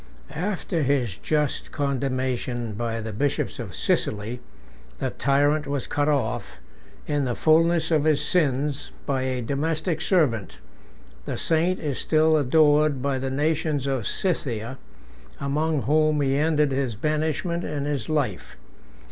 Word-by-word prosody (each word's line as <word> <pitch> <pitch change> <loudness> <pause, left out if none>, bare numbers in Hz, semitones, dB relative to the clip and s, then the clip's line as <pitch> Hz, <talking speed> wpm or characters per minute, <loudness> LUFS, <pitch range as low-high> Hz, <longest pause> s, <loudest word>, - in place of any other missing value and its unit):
After 175 0 -2
his 130 -8 +1
just 150 - -1
condemnation 130 -4 -2
by 115 +1 -3
the 110 0 -5
bishops 140 +7 -1
of - - -6
Sicily, 110 +4 -1 0.6
the 130 -2 -2
tyrant 145 +2 +2
was 140 -3 -2
cut 145 +1 0
off, 140 -7 -1 0.5
in 145 -2 0
the 120 -2 -1
fullness 165 +1 +3
of 155 -2 +3
his 155 -2 +3
sins, 145 -3 0
by 135 -2 0
a 130 -1 -2
domestic 155 +5 -1
servant: 135 - +1 0.7
the - - -3
saint 170 +3 +1
is 145 -4 -3
still 155 0 +3
adored 150 -1 +3
by 140 -2 0
the 135 0 -2
nations 150 0 0
of 135 -5 -1
Scythia, 130 - -2 0.6
among 150 +1 0
whom 155 +1 +3
he 135 -1 +2
ended 150 -1 +2
his 130 -4 -1
banishment 155 - -1
and 145 -2 -3
his 140 -6 -2
life. 140 - -2
145 Hz, 135 wpm, -25 LUFS, 130-155 Hz, 0.7 s, fullness